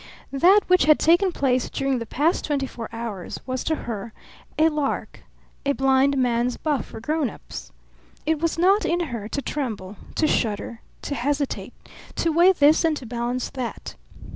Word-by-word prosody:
That 365 Hz, +9 st, +6 dB
which 365 Hz, 0 st, +4 dB
had 305 Hz, 0 st, +6 dB
taken 345 Hz, +4 st, +4 dB
place 260 Hz, -6 st, 0 dB
during 275 Hz, -2 st, -1 dB
the 230 Hz, -, -6 dB
past 305 Hz, -, +1 dB
twenty 285 Hz, -3 st, 0 dB
four 230 Hz, -3 st, -7 dB
hours 225 Hz, -6 st, -5 dB
was 255 Hz, -1 st, -3 dB
to 315 Hz, -, +1 dB
her 220 Hz, -1 st, -5 dB, 0.4 s
a 315 Hz, -, +5 dB
lark, 300 Hz, -3 st, -2 dB, 0.4 s
a 280 Hz, -, +1 dB
blindman's 260 Hz, -3 st, +2 dB
buff 295 Hz, -4 st, -1 dB
for -, -, -9 dB
grown 300 Hz, +3 st, 0 dB
ups. 190 Hz, -, -10 dB, 0.5 s
It 315 Hz, 0 st, +1 dB
was 330 Hz, +1 st, 0 dB
not 390 Hz, +5 st, +4 dB
in 345 Hz, +1 st, +1 dB
her 220 Hz, -3 st, -4 dB
to 280 Hz, -, -3 dB
tremble, 215 Hz, -9 st, -4 dB, 0.2 s
to 315 Hz, -, +2 dB
shudder, 225 Hz, -3 st, -1 dB, 0.2 s
to -, -, -3 dB
hesitate, 285 Hz, +2 st, -2 dB, 0.4 s
to 330 Hz, -, +1 dB
weigh 345 Hz, +4 st, +6 dB
this 300 Hz, -1 st, +4 dB
and 320 Hz, -2 st, +2 dB
to 260 Hz, -, -8 dB
balance 240 Hz, +1 st, -3 dB
that. 245 Hz, -5 st, -5 dB
275 Hz, 165 wpm, -24 LUFS, 235-315 Hz, 0.5 s, That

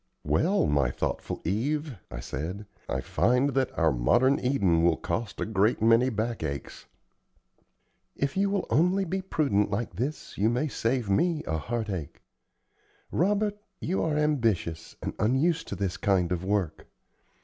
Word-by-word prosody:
"Well, -, -, +2 dB
my 70 Hz, -4 st, +2 dB
thoughtful -, -, -3 dB
Eve," 140 Hz, -, -1 dB
I -, -, -6 dB
said, 90 Hz, -, -5 dB, 0.2 s
"I -, -, -1 dB
find 125 Hz, +4 st, +2 dB
that 130 Hz, 0 st, +1 dB
our 80 Hz, -1 st, +4 dB
modern 120 Hz, -, +3 dB
Eden 100 Hz, -11 st, +2 dB
will 85 Hz, -2 st, +3 dB
cost 100 Hz, +5 st, -3 dB
a -, -, 0 dB
great 105 Hz, +1 st, +2 dB
many 115 Hz, +3 st, +4 dB
back 115 Hz, 0 st, -2 dB
aches." 70 Hz, -3 st, -5 dB, 1.3 s
"If 140 Hz, 0 st, -1 dB
you 200 Hz, +1 st, +2 dB
will 200 Hz, 0 st, 0 dB
only 180 Hz, +5 st, +3 dB
be 190 Hz, +2 st, -2 dB
prudent 135 Hz, -, +1 dB
like 105 Hz, +1 st, -2 dB
this, 135 Hz, +1 st, -4 dB
you 105 Hz, +3 st, +4 dB
may 125 Hz, +6 st, 0 dB
save 120 Hz, -2 st, -1 dB
me 155 Hz, -, +1 dB
a 80 Hz, 0 st, -1 dB
heart 115 Hz, +2 st, -3 dB
ache. 80 Hz, -7 st, -5 dB, 0.9 s
Robert, 205 Hz, +4 st, +1 dB, 0.2 s
you 185 Hz, +4 st, -1 dB
are 155 Hz, -2 st, 0 dB
ambitious, 115 Hz, -, 0 dB
and -, -, -3 dB
unused 150 Hz, +9 st, +2 dB
to -, -, -4 dB
this 95 Hz, -3 st, -2 dB
kind 90 Hz, -3 st, +1 dB
of 90 Hz, 0 st, -1 dB
work. 95 Hz, -5 st, -1 dB
115 Hz, 155 wpm, -28 LUFS, 90-150 Hz, 1.3 s, our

